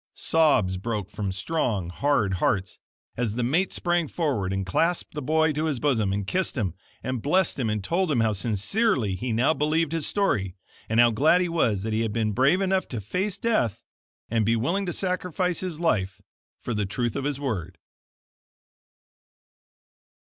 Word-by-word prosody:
Sobs 130 Hz, -13 st, +2 dB
broke 105 Hz, -1 st, -4 dB
from 100 Hz, -2 st, -3 dB
strong, 100 Hz, -, -1 dB
hard 120 Hz, -1 st, +1 dB
hearts, 100 Hz, -10 st, 0 dB, 0.4 s
as 115 Hz, -3 st, -2 dB
the 120 Hz, -, -1 dB
mate 165 Hz, +10 st, +1 dB
sprang 175 Hz, -2 st, 0 dB
forward 135 Hz, -, -1 dB
and 95 Hz, 0 st, -2 dB
clasped 165 Hz, -, 0 dB
the 150 Hz, -, -4 dB
boy 160 Hz, +3 st, +2 dB
to 150 Hz, +2 st, -1 dB
his 145 Hz, -6 st, -1 dB
bosom, 115 Hz, -9 st, +1 dB
and 100 Hz, 0 st, -2 dB
kissed 185 Hz, -, -1 dB
him, 95 Hz, -8 st, -1 dB, 0.3 s
and 130 Hz, 0 st, -2 dB
blessed 180 Hz, -, +1 dB
him, 115 Hz, -4 st, 0 dB
and 105 Hz, -2 st, -2 dB
told 175 Hz, -, 0 dB
him 140 Hz, -6 st, +2 dB
how 110 Hz, -1 st, +3 dB
sincerely 115 Hz, -, 0 dB
he 120 Hz, +5 st, -3 dB
now 120 Hz, +7 st, +3 dB
believed 155 Hz, +1 st, +1 dB
his 165 Hz, -2 st, -1 dB
story 100 Hz, -, 0 dB, 0.3 s
and 110 Hz, +1 st, +2 dB
how 120 Hz, 0 st, +6 dB
glad 155 Hz, +10 st, +4 dB
he 180 Hz, -, 0 dB
was 115 Hz, -, +1 dB
that 110 Hz, 0 st, -2 dB
he 110 Hz, -, +1 dB
had 110 Hz, -2 st, -1 dB
been 110 Hz, -2 st, 0 dB
brave 135 Hz, -, +3 dB
enough 190 Hz, -1 st, +1 dB
to 120 Hz, -, -4 dB
face 185 Hz, -, -2 dB
death 195 Hz, -, 0 dB, 0.4 s
and 115 Hz, -1 st, +1 dB
be 115 Hz, +2 st, +2 dB
willing 175 Hz, -, 0 dB
to -, -, -1 dB
sacrifice 180 Hz, -1 st, -1 dB
his 180 Hz, -4 st, -4 dB
life 95 Hz, -, 0 dB, 0.4 s
for 120 Hz, -, -4 dB
the 105 Hz, -2 st, -1 dB
truth 120 Hz, +3 st, -2 dB
of 140 Hz, -, -2 dB
his 145 Hz, -1 st, -2 dB
word. 95 Hz, -, -3 dB
125 Hz, 180 wpm, -25 LUFS, 105-165 Hz, 0.4 s, how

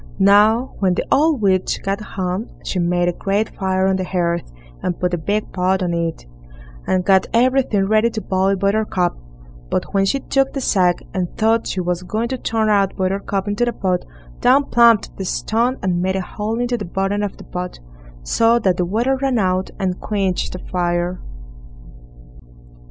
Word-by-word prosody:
Now, 210 Hz, +5 st, +4 dB
when 185 Hz, -2 st, +2 dB
the -, -, -2 dB
old 295 Hz, -5 st, +3 dB
witch 185 Hz, -2 st, +1 dB
got 195 Hz, +2 st, -2 dB
home, 190 Hz, +1 st, -3 dB, 0.2 s
she 185 Hz, -, -2 dB
made 175 Hz, 0 st, +1 dB
a 175 Hz, -, +1 dB
great 200 Hz, +4 st, -1 dB
fire 190 Hz, -1 st, 0 dB
on 190 Hz, 0 st, +2 dB
the 185 Hz, -, -2 dB
hearth, 170 Hz, -, -1 dB, 0.3 s
and 175 Hz, -, -2 dB
put 180 Hz, 0 st, -1 dB
a -, -, +1 dB
big 205 Hz, +6 st, -2 dB
pot 185 Hz, +1 st, +1 dB
on 175 Hz, -1 st, -1 dB
it, 165 Hz, -, -2 dB, 0.6 s
and 185 Hz, -1 st, +1 dB
got 190 Hz, -1 st, +4 dB
everything 245 Hz, -5 st, +3 dB
ready 215 Hz, +2 st, +3 dB
to 225 Hz, -, -4 dB
boil 190 Hz, 0 st, +1 dB
Buttercup; 200 Hz, -2 st, 0 dB, 0.5 s
but -, -, -2 dB
when 195 Hz, -1 st, +3 dB
she 275 Hz, +8 st, +1 dB
took 270 Hz, 0 st, 0 dB
the 275 Hz, -, -2 dB
sack, 180 Hz, -8 st, +2 dB
and 180 Hz, -2 st, -1 dB
thought 225 Hz, +1 st, +2 dB
she 185 Hz, -, -2 dB
was 180 Hz, 0 st, -1 dB
going 215 Hz, +6 st, -2 dB
to 260 Hz, -1 st, -3 dB
turn 225 Hz, -2 st, 0 dB
out 200 Hz, -2 st, +2 dB
Buttercup 195 Hz, +1 st, -1 dB
into 205 Hz, +3 st, 0 dB
the 240 Hz, 0 st, 0 dB
pot, 185 Hz, -4 st, -1 dB, 0.4 s
down 275 Hz, +3 st, +3 dB
plumped 235 Hz, -3 st, +4 dB
the 195 Hz, -, -4 dB
stone 230 Hz, +6 st, 0 dB
and 180 Hz, -2 st, 0 dB
made 190 Hz, +1 st, 0 dB
a 190 Hz, -, 0 dB
hole 215 Hz, +4 st, -4 dB
in 245 Hz, -, +1 dB
the 240 Hz, -3 st, -2 dB
bottom 195 Hz, +3 st, -1 dB
of 205 Hz, -2 st, -3 dB
the -, -, -11 dB
pot, 180 Hz, 0 st, -6 dB, 0.4 s
so 230 Hz, -, +3 dB
that 185 Hz, -6 st, +1 dB
the 180 Hz, -, +1 dB
water 235 Hz, +9 st, +1 dB
ran 265 Hz, -2 st, 0 dB
out 185 Hz, -2 st, 0 dB
and 185 Hz, -2 st, -2 dB
quenched 195 Hz, -4 st, -1 dB
the 180 Hz, -, -6 dB
fire. 175 Hz, 0 st, -1 dB
195 Hz, 185 wpm, -20 LUFS, 180-220 Hz, 0.6 s, Now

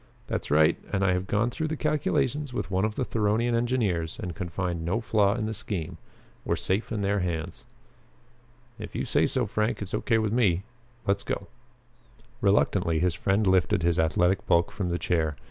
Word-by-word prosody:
"That's -, -, -3 dB
right. 75 Hz, +1 st, +4 dB
And 100 Hz, -, +1 dB
I 90 Hz, -, +3 dB
have 90 Hz, +1 st, -2 dB
gone 110 Hz, +4 st, +1 dB
through 155 Hz, +4 st, -2 dB
the 155 Hz, 0 st, -3 dB
calculations 150 Hz, -2 st, 0 dB
with 110 Hz, -, -3 dB
one 95 Hz, +2 st, +2 dB
of 110 Hz, 0 st, -2 dB
the 130 Hz, -, -1 dB
Theronian 115 Hz, +2 st, +1 dB
engineers 115 Hz, -9 st, 0 dB
and 90 Hz, -2 st, -4 dB
can 85 Hz, +2 st, -5 dB
find 85 Hz, -2 st, -3 dB
no 90 Hz, +8 st, 0 dB
flaw 105 Hz, -3 st, +2 dB
in 115 Hz, -3 st, -2 dB
the 110 Hz, -, -2 dB
scheme. 90 Hz, -5 st, -5 dB, 0.4 s
We're 85 Hz, -, 0 dB
safe 95 Hz, +7 st, -1 dB
in 110 Hz, -3 st, -1 dB
their 100 Hz, +1 st, +1 dB
hands." 85 Hz, -3 st, -4 dB, 1.1 s
"If -, -, -8 dB
you -, -, -1 dB
say -, -, +2 dB
so, -, -, 0 dB
Frank, 110 Hz, +2 st, -1 dB
it's 100 Hz, -1 st, -6 dB
okay 115 Hz, -, +1 dB
with 110 Hz, -1 st, 0 dB
me. 100 Hz, -7 st, +2 dB, 0.4 s
Let's 100 Hz, 0 st, +1 dB
go!" 100 Hz, -, -3 dB, 1.0 s
Reluctantly 100 Hz, -4 st, +2 dB
his 90 Hz, +1 st, +2 dB
friend 100 Hz, +4 st, +1 dB
lifted 90 Hz, -3 st, +3 dB
his 85 Hz, -1 st, +2 dB
athletic 90 Hz, +4 st, +2 dB
bulk 85 Hz, 0 st, +3 dB
from 95 Hz, -3 st, -3 dB
the 85 Hz, -, 0 dB
chair. 80 Hz, -4 st, 0 dB
100 Hz, 190 wpm, -27 LUFS, 85-110 Hz, 1.1 s, right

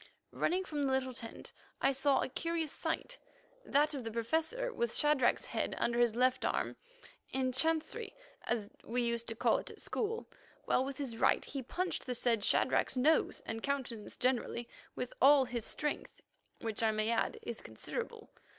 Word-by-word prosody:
Running 370 Hz, +3 st, 0 dB
from 300 Hz, -5 st, -3 dB
the 275 Hz, -1 st, +1 dB
little 260 Hz, -1 st, 0 dB
tent, 230 Hz, -1 st, -8 dB, 0.3 s
I 270 Hz, -, +4 dB
saw 275 Hz, +1 st, +3 dB
a -, -, -1 dB
curious 330 Hz, +2 st, -1 dB
sight, -, -, -3 dB, 0.4 s
that 300 Hz, -3 st, +3 dB
of 270 Hz, -3 st, -4 dB
the 225 Hz, -, -3 dB
Professor 320 Hz, -, -1 dB
with 235 Hz, -, 0 dB
Shadrach's 295 Hz, -4 st, +3 dB
head -, -, -2 dB
under 235 Hz, 0 st, +1 dB
his 240 Hz, -2 st, +4 dB
left 255 Hz, +1 st, +3 dB
arm, -, -, 0 dB, 0.5 s
in 260 Hz, -1 st, 0 dB
chancery, 325 Hz, -, +1 dB, 0.3 s
as 220 Hz, -4 st, -1 dB, 0.2 s
we 245 Hz, +2 st, -1 dB
used 235 Hz, 0 st, -1 dB
to 225 Hz, -, -3 dB
call -, -, +3 dB
it -, -, -8 dB
at -, -, -11 dB
school, 455 Hz, +1 st, -2 dB, 0.4 s
while 255 Hz, -, +3 dB
with 270 Hz, 0 st, -5 dB
his 260 Hz, -6 st, -3 dB
right -, -, +3 dB
he 275 Hz, -, -4 dB
punched 355 Hz, +8 st, -2 dB
the 250 Hz, -, -1 dB
said 230 Hz, -3 st, +2 dB
Shadrach's 260 Hz, +4 st, +3 dB
nose 310 Hz, +5 st, +3 dB
and 225 Hz, 0 st, -4 dB
countenance 255 Hz, -6 st, -3 dB
generally 245 Hz, -1 st, 0 dB, 0.3 s
with 250 Hz, -, -4 dB
all 275 Hz, 0 st, +7 dB
his 240 Hz, -2 st, -3 dB
strength, 295 Hz, 0 st, -3 dB, 0.4 s
which, 225 Hz, -1 st, -2 dB
I 225 Hz, -, +4 dB
may 215 Hz, +1 st, +1 dB
add, 230 Hz, -, +1 dB
is 235 Hz, -, -4 dB
considerable. 110 Hz, 0 st, -5 dB
260 Hz, 175 wpm, -34 LUFS, 235-295 Hz, 0.5 s, all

